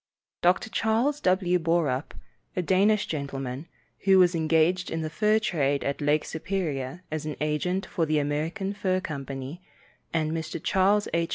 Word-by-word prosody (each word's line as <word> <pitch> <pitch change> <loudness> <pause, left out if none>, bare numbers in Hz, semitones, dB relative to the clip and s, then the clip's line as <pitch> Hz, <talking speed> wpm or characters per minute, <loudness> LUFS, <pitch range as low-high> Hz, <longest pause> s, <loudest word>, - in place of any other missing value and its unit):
Dr. 180 +5 +2
Charles 235 +7 +1
W. 185 -1 +2
Borup, 160 -5 0 0.4
a 180 - 0
Danish 200 +4 +3
gentleman, 140 -1 -4 0.4
who 195 -1 +6
was 180 -1 +5
engaged 165 +3 +2
in 165 - -2
the 155 - -4
fur 215 +5 +3
trade 145 -10 0
at 140 +1 -2
Lake 150 +1 +2
Superior 160 -3 -3
as 155 -1 -3
an 150 - -3
agent 180 +5 -1
for 165 -3 -1
the 155 0 +2
American 160 +8 -1
Fur 185 -2 0
Company, 140 -1 -6 0.5
and 155 -2 0
Mr. 160 -1 -3
Charles 200 +2 +3
H. 170 0 +1
165 Hz, 155 wpm, -27 LUFS, 150-185 Hz, 0.5 s, who